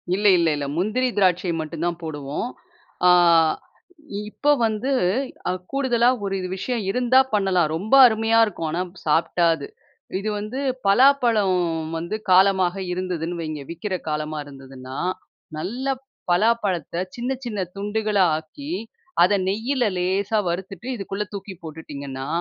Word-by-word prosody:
இல்ல 205 +1 +2
இல்ல 170 - +2
இல்ல 145 -1 -3
முந்திரி 225 +8 +1
திராட்சை 180 -2 +2
மட்டும் 160 +1 -5
தான் 175 -1 -2
போடுவோம். 145 - -4 0.6
ஆ - - +7 1.2
இப்ப 290 +6 +2
வந்து 220 +5 -1 0.8
கூடுதலா 250 -3 +2 0.2
ஒரு 195 0 -1 0.2
விஷயம் 235 +3 -2
இருந்தா 250 +3 +4
பண்ணலாம். 190 -5 +2
ரொம்ப 205 +10 -3
அருமையா 225 0 +2
இருக்கும். 165 -6 -4
ஆனா 170 +3 -1 0.2
சாப்பிட்டா 165 +2 +2
அது. 140 -3 -8 0.5
இது 215 +2 -3
வந்து 215 +6 -5 0.3
பலாப்பழம் 225 -5 +4 0.4
வந்து 170 +6 -3 0.2
காலமாக 190 -1 +4 0.2
இருந்ததுன்னு 175 -2 -3
வையங்க, 155 -2 -5
விக்கிற 185 +3 -3
காலமா 155 0 -3
இருந்ததுன்னா 135 -2 -10 0.6
நல்ல 215 +12 -4 0.5
பலாப்பழத்த 195 -4 +1 0.2
சின்ன 245 +2 -3
சின்ன 210 -4 -4 0.2
துண்டுகளாஆக்கி, 205 - -1 0.5
அத 200 +2 +4
நெய்யில 240 +6 0
லேசா 195 +4 0
வறுத்துட்டு 190 +5 -5
இதுக்குள்ள 200 0 -4
தூக்கி 195 0 -6
போட்டுட்டீங்கன்னா, 140 -4 -7
190 Hz, 120 wpm, -23 LUFS, 165-220 Hz, 1.2 s, ஆ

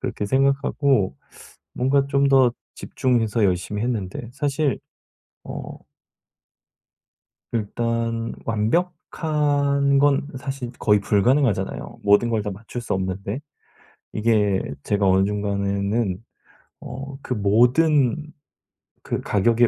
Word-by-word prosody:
그렇게 120 -5 -3
생각하고 135 - +1 0.6
뭔가 135 +2 +2
좀 140 0 +2
더 130 -3 +5 0.2
집중해서 115 -4 0
열심히 95 +3 -1
했는데 115 -1 -3
사실 140 -1 0 0.7
어 - - -6 1.9
일단 115 +1 -2
완벽한 145 +2 +1
건 140 0 +3
사실 135 -2 -5
거의 105 -1 +3
불가능하잖아요 105 0 +1
모든 105 +3 +4
걸 110 -2 0
다 105 - -3
맞출 110 +5 -7
수 - - -3
없는데. 95 +4 -3 0.7
이게 105 -3 +2 0.2
제가 100 -1 +1
어느 95 +1 +4
중간에는 100 0 -1 0.6
어 135 +1 -8
그 125 - -3
모든 130 +8 +3 0.7
그 - - -3
가격의 115 +4 +3
115 Hz, 210 characters per minute, -23 LUFS, 105-140 Hz, 1.9 s, 더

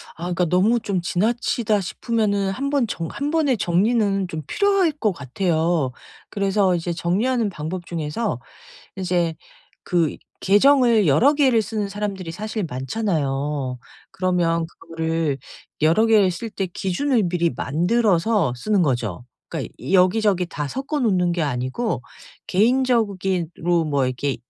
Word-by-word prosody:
아 165 - -9
그러니까 180 0 0
'너무 195 +8 +3
좀 200 -5 -2
지나치다.' 215 +2 0
싶으면은 205 -1 -1
한번 275 +1 0
정 165 -4 -4
1 290 +2 -3
번의 295 -7 +2
정리는 195 +1 +1
좀 160 -2 -5
필요할 395 -5 +2
것 235 -8 0
같아요. 160 0 0 0.4
그래서 195 -2 +1
이제 170 0 -2
정리하는 215 +7 0
방법 175 +1 -5
중에서 165 - -3 0.6
이제 175 -3 0 0.5
그 170 -4 +1 0.3
계정을 230 - +4
여러 245 - +5
개를 260 -6 +3
쓰는 210 0 -3
사람들이 195 -4 -4
사실 215 +2 -4
많잖아요. 135 - -2 0.3
그러면 175 -3 0
그거를 165 -3 -3 0.4
여러 165 +9 +4
개를 210 -4 +4
쓸 225 +6 -6
때 195 -2 -3
기준을 215 +7 0
미리 170 -1 +1
만들어서 180 - +1
쓰는 200 +7 +1
거죠. 120 - -1 0.2
그러니까 - - -5 0.2
여기저기 185 0 +3
다 150 -4 -4
섞어 275 - -3
놓는 185 -7 +2
게 170 -1 -1
아니고 130 - -2 0.5
개인적으로 190 -8 +1
뭐 140 -3 +1
이렇게 130 +2 -2
185 Hz, 290 characters per minute, -22 LUFS, 165-220 Hz, 0.6 s, 여러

